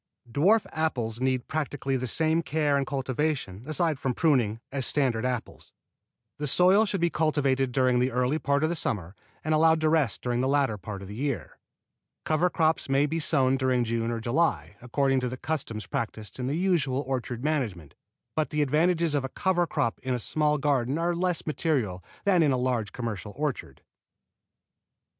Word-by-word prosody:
Dwarf 185 - +3
apples 125 -8 -2
need 130 -1 0
practically 145 -3 -2
the 130 0 -2
same 160 +5 +2
care 150 -2 0
and 140 -1 0
cultivation, 135 -6 -2
aside 155 -1 0
from 130 -3 -1
pruning, 120 -9 +2
as 135 -2 -1
standard 125 -5 +1
apples. 125 -2 -5 0.7
The 150 - -2
soil 185 +9 +5
should 195 -2 -2
be 170 0 +2
cultivated 140 -4 +1
during 125 -1 +2
the 125 +1 +2
early 125 +5 +1
part 140 +1 +1
of 155 - +2
the 170 - -1
summer 100 - -2 0.3
and 155 - 0
allowed 160 +1 +4
to 155 - +3
rest 155 -7 +1
during 120 0 0
the 130 - +1
latter 135 -6 +1
part 100 +1 -7
of - - -9
the 100 - -8
year. 135 +3 -4 0.7
Cover 160 +3 +2
crops 160 -4 +1
may 135 +1 +3
be 160 +3 -2
sown 135 -4 +2
during 130 -2 +1
June 115 0 -1
or 115 -1 -2
July, 115 - 0
according 135 +2 +1
to 125 -1 -2
the 130 - -6
custom 130 -7 -3
practised 110 -1 -4
in 125 - -2
the 140 - -1
usual 155 -8 +1
orchard 125 -2 -3
management; 115 - -2 0.4
but 155 -1 0
the 150 -1 +1
advantages 165 +3 +2
of 145 -2 +1
a 135 - -3
cover 175 +3 +1
crop 115 - -1
in 130 -1 -1
a - - -3
small 150 +4 +1
garden 140 -1 +1
are 170 +1 0
less 180 -1 -1
material 130 - -1 0.2
than 190 -4 +4
in 150 -3 +4
a 130 - +1
large 125 -4 -1
commercial 105 -4 -5
orchard. 145 -3 -4
135 Hz, 185 wpm, -27 LUFS, 125-155 Hz, 0.7 s, soil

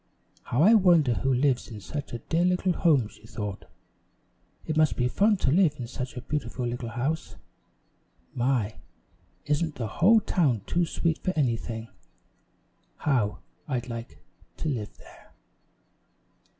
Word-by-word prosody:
"How 125 +6 +2
I 215 +5 +7
wonder 175 - +5
who 135 +4 0
lives 130 0 +2
in 110 -3 -8
such 140 +8 -6
a 120 - -3
dear 165 +8 0
little 180 0 +2
home!" 150 - +3
she 110 - -17
thought. 105 -3 -5 1.0
"It 155 - -2
must 155 -1 +3
be 125 - +2
fun 205 - +3
to 130 - +1
live 165 -2 +4
in 125 - -3
such 125 +2 -6
a - - -4
beautiful 140 -4 -3
little 120 0 -3
house. 125 +1 -3 1.0
My, 120 -4 0 0.7
isn't 150 +1 0
the 120 - -3
whole 190 - +4
town 145 - +1
too 175 -1 +1
sweet 165 0 -1
for 185 - -1
anything! 115 -5 -1 1.1
How 120 -8 0 0.3
I'd 125 -4 -3
like 115 0 -7 0.4
to 160 - -2
live 110 -7 -4
there!" - - -18
135 Hz, 145 wpm, -27 LUFS, 120-160 Hz, 1.1 s, I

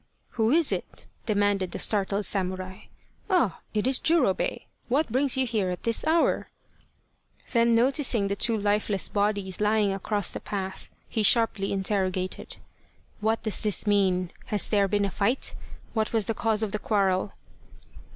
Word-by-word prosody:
" - - -44
Who 225 -1 0
is 320 +3 +4
it? - - -5
" - - -37
demanded 205 -3 +1
the - - -3
startled 200 -1 +1
samurai. 185 -1 -2 0.2
" - - -38
Ah 335 - +1
it 210 0 -1
is 260 0 +3
Jurobei! 305 - +1 0.3
What 275 +1 +1
brings 265 +2 +2
you 265 - +2
here 215 -6 -1
at 180 - -5
this 230 +4 +1
hour? 325 +1 +2 0.5
" - - -27
Then 235 -1 +3
noticing 245 -3 +2
the 200 - -2
two 225 +2 +1
lifeless 205 -1 +1
bodies 200 -2 -1
lying 210 -1 +2
across 205 0 -2
the - - -3
path, 190 -2 -6 0.2
he 220 - -2
sharply 215 -2 +2
interrogated, 190 -2 -2 0.3
" - - -35
What 220 +1 0
does 215 -4 +1
this 210 -1 +1
mean? 190 -4 +1 0.2
Has 210 -2 0
there 200 -2 +2
been 205 +1 0
a 195 - -3
fight? 225 +8 0 0.4
What 220 -1 -1
was 220 -3 +1
the 225 - 0
cause 220 0 0
of 210 - -2
the 210 - -2
quarrel 195 -2 0
210 Hz, 170 wpm, -26 LUFS, 195-230 Hz, 0.5 s, is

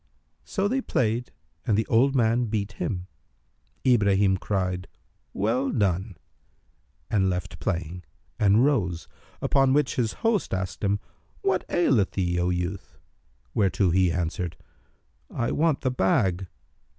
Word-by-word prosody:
So 195 +1 -1
they 265 +5 0
played 120 - -1 0.3
and 110 -5 +1
the 110 - +1
old 130 +4 +3
man 120 0 +3
beat 105 -2 -2
him. 90 -2 -3 0.8
Ibrahim 100 -6 +4
cried, 90 -2 -2 0.4
"Well 120 +7 0
done!" 95 -3 0 0.9
and 95 -3 +3
left 90 -1 -4
playing 90 -2 -3 0.4
and 105 +3 +5
rose: 90 - 0 0.4
upon 135 -1 +3
which 145 -2 +1
his 115 -3 +1
host 220 - +1
asked 95 +2 -4
him, 100 0 +1 0.4
"What 190 -1 +1
aileth 130 - +2
thee, 90 -2 0
O 90 +1 +1
youth?" 90 +2 -3 0.6
whereto 95 -2 +2
he 90 0 +3
answered, 85 0 -2 0.7
"I 120 - -2
want 160 -2 +1
the 130 - 0
bag." 95 -4 +1
100 Hz, 125 wpm, -26 LUFS, 90-125 Hz, 0.9 s, and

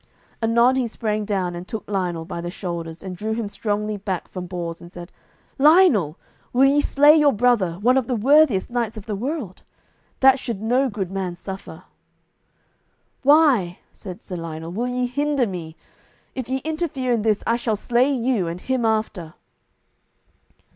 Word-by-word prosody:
Anon 235 +3 +3
he 255 -2 0
sprang 215 -2 -2
down 190 -4 -1
and 175 +1 -7
took 220 - -6
Lionel 180 -5 -2
by 170 -1 -6
the 175 - -4
shoulders, 170 -3 -6
and 185 -1 -6
drew 215 +4 -3
him 225 -1 -3
strongly 210 +1 -2
back 190 -3 -4
from 180 -1 -7
Bors, 170 -2 -5
and 175 - -12
said, 175 0 -10 0.5
"Lionel, 280 - +5 0.4
will 260 +2 +5
ye 285 +2 +4
slay 290 +2 +5
your 300 -2 +5
brother, 230 -6 +2
one 235 +9 +2
of 255 - -5
the 255 - 0
worthiest 260 -3 +3
knights 235 -2 -2
of 210 - -8
the 215 -3 -3
world? 245 - -4 0.6
That 265 0 +6
should 235 -6 -4
no 250 +5 +1
good 195 -4 -4
man 190 -2 -3
suffer." 190 +2 -9 1.4
"Why," 270 - +4 0.2
said 185 -3 -10
Sir 180 - -6
Lionel, 165 0 -6
"will 230 +7 -2
ye 250 0 -1
hinder 285 +1 0
me? 170 -6 -6 0.6
If 255 -2 -5
ye 265 0 -1
interfere 310 -5 -2
in 235 -2 +2
this, 215 -1 +1
I 230 - +2
shall 235 -2 -1
slay 245 +6 +1
you, 240 -8 0
and 170 +2 -5
him 255 +2 -1
after." 215 -7 -2
220 Hz, 170 wpm, -22 LUFS, 185-255 Hz, 1.4 s, That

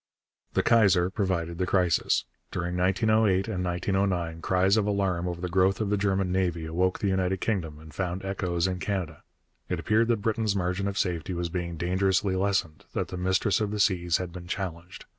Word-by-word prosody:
The - - +2
Kaiser 100 -6 +4
provided 90 -5 -2
the 90 - 0
crisis. 90 -3 +2 0.2
During 90 0 -3
1908 95 +1 +2
and 95 -5 -2
1909 90 -2 -1
cries 95 +3 +3
of 105 -2 +2
alarm 95 -4 0
over 85 -1 -4
the 90 - -3
growth 95 +2 +2
of 105 -2 -1
the - - +3
German 95 -2 0
navy 90 -3 0
awoke 90 +3 0
the 100 - -1
United 95 0 0
Kingdom 85 -9 -2
and 80 0 -13
found 95 +1 -3
echoes 90 -3 -1
in 95 -1 -1
Canada. 90 -4 -3 0.5
It - - -1
appeared 110 +2 +2
that 115 -4 0
Britain's 110 -2 0
margin 90 +1 -1
of 100 0 -3
safety 90 0 -1
was 85 0 -2
being 85 -1 -4
dangerously 95 +2 +1
lessened, 95 -6 -1
that - - -2
the - - -5
Mistress 95 +3 +1
of 105 - 0
the 105 0 -3
Seas 90 -4 +2
had 90 -2 -5
been 90 -1 -8
challenged. 90 -2 -5
95 Hz, 190 wpm, -27 LUFS, 90-100 Hz, 0.5 s, Kaiser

